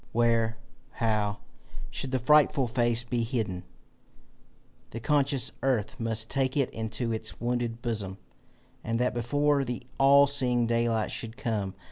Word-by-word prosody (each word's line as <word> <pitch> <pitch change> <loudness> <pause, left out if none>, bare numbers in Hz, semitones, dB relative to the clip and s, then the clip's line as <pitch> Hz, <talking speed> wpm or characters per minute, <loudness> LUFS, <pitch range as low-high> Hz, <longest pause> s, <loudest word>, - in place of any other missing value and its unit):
Where, 115 -1 +2 0.4
how, 105 -3 -1 0.5
should 135 - -4
the 130 - 0
frightful 140 +1 +4
face 120 0 +1
be 120 0 -2
hidden? 110 -7 -3 1.2
The 115 - -6
conscious 140 0 +1
earth 125 -6 -1
must 115 -1 +3
take 135 +1 -1
it 140 - +1
into 110 +1 -2
its 110 -1 -3
wounded 120 0 -2
bosom, 105 -5 -3 0.7
and 115 +1 -1
that 125 +1 0
before 145 +4 +1
the 125 0 -5 0.2
all 140 +1 +7
seeing 125 -4 +2
daylight 115 -1 0
should 115 0 -5
come. 100 -5 -2
120 Hz, 135 wpm, -28 LUFS, 110-130 Hz, 1.2 s, all